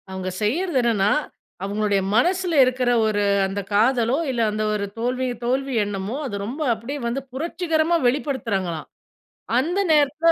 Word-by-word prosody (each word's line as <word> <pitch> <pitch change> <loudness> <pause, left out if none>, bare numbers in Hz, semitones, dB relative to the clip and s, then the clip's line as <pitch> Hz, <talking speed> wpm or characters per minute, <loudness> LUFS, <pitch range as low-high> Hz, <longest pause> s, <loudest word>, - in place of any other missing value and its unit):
அவுங்க 190 0 -4
செய்யிறது 320 - 0
என்னன்னா, 215 -4 +2 0.5
அவுங்களுடைய 205 0 0
மனசில 360 +7 +2
இருக்கிற 250 -1 +1
ஒரு, 205 -1 +1 0.2
அந்த 195 +1 -3
காதலோ! 235 +3 +3
இல்ல 245 -3 -1
அந்த 215 +1 -2
ஒரு 205 -1 -1
தோல்வி 250 +2 -1 0.2
தோல்வி 265 +2 0
எண்ணமோ! 200 +3 -4
அது 205 - -5
ரொம்ப 260 +9 -5
அப்பிடியே 235 +6 -6
வந்து 245 +4 -2
புரட்சிகரமா 330 +2 0
வெளிப்படுத்துறாங்களாம்! 230 - -2 0.7
அந்த 340 +9 0
நேரத்தில 305 +2 +4
245 Hz, 135 wpm, -23 LUFS, 210-290 Hz, 0.7 s, நேரத்தில